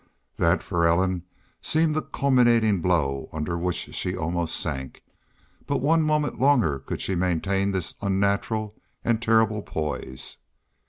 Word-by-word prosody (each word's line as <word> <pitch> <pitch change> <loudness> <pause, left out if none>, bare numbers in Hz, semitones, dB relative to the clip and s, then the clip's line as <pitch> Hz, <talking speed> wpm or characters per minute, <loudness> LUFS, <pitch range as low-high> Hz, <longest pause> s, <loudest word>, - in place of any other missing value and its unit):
That - - +2
for 85 -1 -1
Ellen 90 +1 +1 0.4
seemed 160 0 +3
the 155 - 0
culminating 120 - +2
blow 75 -7 0
under 80 +2 -3
which 90 +1 -3
she - - -2
almost 85 +1 -1
sank. 65 -1 -3 0.6
But - - +1
one 160 +5 +3
moment 150 -1 0
longer 120 - +3
could 65 - -6
she 95 - -1
maintain 95 +2 0
this 95 -3 -2
unnatural 100 +2 0 0.3
and 115 -1 +1
terrible 110 -2 +2
poise. 75 -7 -4
95 Hz, 130 wpm, -25 LUFS, 85-115 Hz, 0.6 s, seemed